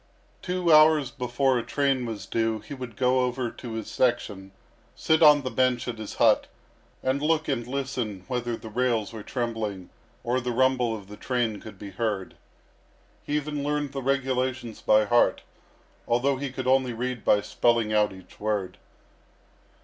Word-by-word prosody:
Two 180 -2 +1
hours 155 -3 +6
before 125 0 0
a - - -4
train 135 0 0
was 105 -4 -5
due 115 +1 0
he 140 - -10
would 125 -5 -7
go 130 +1 +2
over 125 -1 -1
his 110 -3 -6
section, 105 -6 0 0.4
sit 160 0 +2
on 150 -2 +7
the 130 - -3
bench 130 -2 +1
at 115 -2 -4
his 110 - -7
hut, 115 -3 +4 0.6
and 130 +2 0
look 155 +1 +1
and 120 -4 -2
listen 125 -8 -3
whether 120 -2 -2
the 110 - -10
rails 115 -2 0
were 110 - -7
trembling 110 -6 -4 0.3
or 125 +2 0
the 125 - -3
rumble 125 -2 +2
of 100 -3 -10
the 105 0 -10
train 120 -5 -1
could 110 - -11
be 100 -1 -9
heard. 100 -2 -3 0.9
He 145 - -2
even 150 -1 -2
learned 145 -1 -1
the 135 -1 -4
regulations 130 -3 -1
by 110 0 +4
heart, 120 +3 +3 0.6
although 130 +3 +2
he 140 -1 -4
could 130 0 -5
only 130 -1 +2
read 125 0 -4
by 105 - +4
spelling 115 -2 +1
out 105 -1 +3
each 95 -1 -14
word. 105 -3 -2
125 Hz, 165 wpm, -26 LUFS, 110-135 Hz, 0.9 s, on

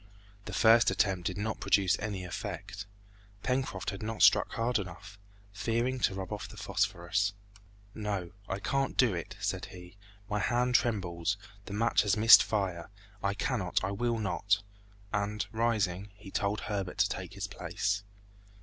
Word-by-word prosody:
The - - -6
first 115 +1 +6
attempt 95 -2 +1
did 95 - -3
not 110 +2 -2
produce 95 -1 +3
any 100 -3 -3
effect. 100 +2 -6 0.6
Pencroft 125 -8 -1
had 100 - -7
not 110 0 -1
struck - - +6
hard 115 0 +1
enough, 100 +2 -8 0.3
fearing 115 +5 0
to 100 - +1
rub 95 +1 -4
off 105 - -6
the 105 - -12
phosphorus. 100 -1 0 0.6
"No, 100 -5 -3 0.2
I 95 - -1
can't 135 +7 -1
do 120 -6 +4
it," 85 -2 -5
said - - -2
he, 90 +1 -12 0.3
"my 105 -1 -1
hand 125 +3 +1
trembles, 100 -5 +1 0.3
the 100 - -7
match 115 +3 +3
has 105 0 +1
missed 115 +2 +10
fire; 95 -5 -2 0.3
I 100 0 0
cannot, 100 - -1
I 95 - -1
will 120 +3 0
not!" 100 0 0 0.5
and 105 +1 -1
rising, 105 -4 0
he 100 -1 -12
told 100 +2 -1
Herbert 100 -4 -3
to - - +4
take - - -5
his - - -4
place. 100 0 -2
100 Hz, 160 wpm, -31 LUFS, 95-110 Hz, 0.6 s, missed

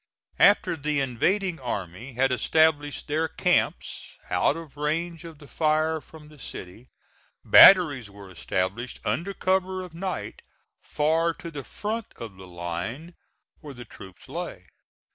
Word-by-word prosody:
After - - +5
the 150 -1 -1
invading 170 - 0
army 115 0 -5
had 130 +2 +2
established 145 +3 +1
their 155 +2 0
camps - - -1 0.2
out 90 - +2
of 165 -4 -10
range 165 +3 -2
of 165 -2 -10
the 145 -1 -15
fire 155 +1 +1
from 155 -1 -15
the 150 -1 -17
city, 110 +2 -9 0.6
batteries 145 - +8
were 100 -1 -13
established, 95 +7 -3
under 195 +4 -1
cover 185 0 0
of 180 -3 -11
night, 185 +2 -5 0.4
far 160 +2 +1
to 170 - -9
the 145 -3 -7
front 220 - -4
of 110 -4 -9
the 95 -1 -12
line 90 - -5 0.5
where 145 -4 -10
the 120 0 -10
troops 95 -3 -14
lay. - - -6
150 Hz, 140 wpm, -26 LUFS, 120-165 Hz, 0.6 s, batteries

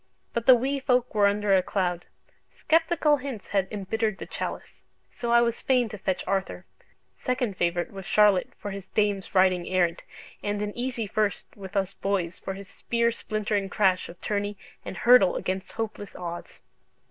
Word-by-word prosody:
But 235 -1 -2
the 255 - +10
Wee 270 +4 -1
Folk 250 -2 +1
were 205 -2 +5
under 205 -1 +2
a 185 - +5
cloud; 180 -2 -2 0.4
sceptical 320 -2 +2
hints 260 -6 -7
had 195 -2 +1
embittered 215 +1 -2
the - - -7
chalice. - - -6 0.3
So 235 -1 -3
I 235 0 +6
was 235 0 0
fain 250 -3 +2
to 210 - -7
fetch 185 -1 -1
Arthur 190 0 -2 0.5
second 250 -5 -1
favourite 175 0 0
with 195 -2 -8
Charlotte 210 -3 +4
for 205 - -6
his 195 -1 -7
dames 205 -2 -1
riding 185 -2 +4
errant, 175 -2 +1 0.4
and 205 0 -2
an 205 0 -4
easy 245 -2 -2
first 210 0 -2
with 195 0 -10
us 195 0 0
boys 185 -3 -2
for 190 - -5
his 195 0 -9
spear 235 +3 0
splintering 215 -3 -2
crash 190 -3 +2
of 170 - -12
tourney 205 -1 -2 0.3
and - - -7
hurtle 240 -7 +6
against 190 0 -3
hopeless 220 -3 -5
odds. 175 -1 -7
205 Hz, 170 wpm, -26 LUFS, 190-235 Hz, 0.5 s, the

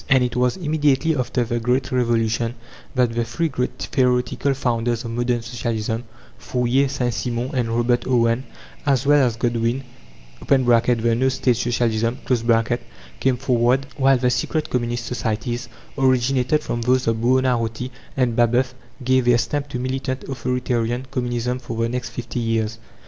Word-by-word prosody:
And 130 -2 +5
it 125 -1 -2
was 125 +3 +1
immediately 155 -2 +1
after 125 -1 0
the 120 0 -2
Great 125 +3 0
Revolution 115 -1 +1 0.4
that 125 -2 +2
the 120 0 0
three 160 +9 -1
great 125 -2 -2
theoretical 125 +1 +1
founders 120 -2 -1
of 115 - -4
modern 120 0 0
Socialism 115 -1 -3 0.3
Fourier, 125 +2 +1
Saint 125 -3 -1
Simon, 120 +3 -2
and 125 -3 0
Robert 120 +1 +1
Owen, 120 -1 +2 0.4
as 135 -2 +1
well 145 0 +5
as 115 - -2
Godwin 120 +2 0 0.6
(the 120 -3 +3
No 130 +3 +2
State 125 -1 +1
Socialism) 115 -1 0 1.0
came 130 -2 +2
forward; 125 +1 +2
while 135 -1 +4
the 125 0 +1
secret 155 +4 -1
communist 120 -1 -1
societies, 120 0 -3 0.3
originated 130 +1 +2
from 120 - -3
those 125 +2 +2
of 115 0 +1
Buonarroti 125 0 +1 0.3
and 125 -3 +1
Babeuf, 120 +2 +2 0.3
gave 130 0 +3
their 120 -1 +5
stamp 145 +4 -2
to 125 - -4
militant, 130 +1 -3
authoritarian 125 -2 -2
Communism 125 -1 -1
for 115 -2 -6
the 115 0 +1
next 125 0 -3
fifty 120 0 -5
years. 115 -1 -1
125 Hz, 150 wpm, -22 LUFS, 115-130 Hz, 1.0 s, And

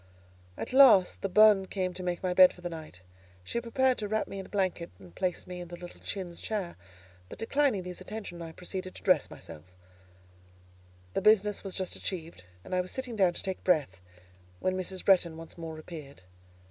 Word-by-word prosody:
At - - -5
last 255 -9 +7
the 195 - -1
bonne 210 -1 +6
came 185 -2 -2
to 180 - -6
make 180 0 -3
my 180 -1 +1
bed 185 0 +8
for 180 - -16
the 175 0 -4
night. 155 - -9 0.4
She 235 - -2
prepared 255 +2 +1
to 210 - -3
wrap 215 +1 -1
me 195 - -6
in 190 - -7
a - - -21
blanket 185 -4 -1
and 90 -3 -15
place 180 - -2
me 180 0 -7
in 175 - -7
the 175 - -8
little 175 0 -11
chintz 180 -4 -5
chair; 200 -6 -3 0.5
but, - - -9
declining 255 -4 +1
these 180 0 -7
attentions, 190 -3 -7
I 165 -1 -6
proceeded 185 +2 -6
to - - -11
dress - - +3
myself: 75 0 -11 1.5
The - - 0
business 210 -1 +4
was 195 -2 -5
just 185 -2 -1
achieved, 165 - -5 0.2
and - - -8
I 180 - +3
was 180 - -7
sitting 255 -3 -4
down 190 -4 +3
to - - -7
take 190 -1 -4
breath, 145 - +1 0.6
when 185 - 0
Mrs. 185 0 -3
Bretton 175 -4 +4
once 165 0 -9
more 165 -2 -7
appeared. 150 - -10
185 Hz, 200 wpm, -30 LUFS, 170-205 Hz, 1.5 s, bed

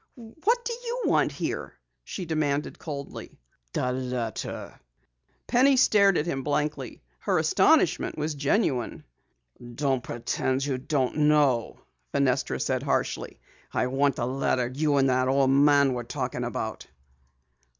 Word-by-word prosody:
"What 320 - -1
do 475 - -1
you 485 +1 -4
want - - +2
here?" - - -4 0.3
she 185 - -6
demanded 150 -3 -1
coldly. 140 -4 -7 0.3
"The 125 - -1
letter." 125 -3 -4 0.7
Penny 265 +2 +4
stared 200 -6 +5
at 150 - 0
him 135 -6 -2
blankly. 145 - -2 0.2
Her - - 0
astonishment - - +3
was 155 +1 -2
genuine. 145 - 0 0.7
"Don't 135 -2 0
pretend 130 +3 -2
you 135 -3 -2
don't 135 0 -1
know," 140 -6 +2 0.3
Fenestra - - +1
said - - 0
harshly. - - -2 0.3
"I - - 0
want 135 +1 +1
the 120 - -2
letter 125 -1 0
you 145 +1 +1
and 135 -1 +4
that 130 0 +2
old 135 0 +3
man 140 -1 +5
were 120 -1 -3
talking 125 0 -3
about." 120 - -4
140 Hz, 130 wpm, -26 LUFS, 130-155 Hz, 0.7 s, stared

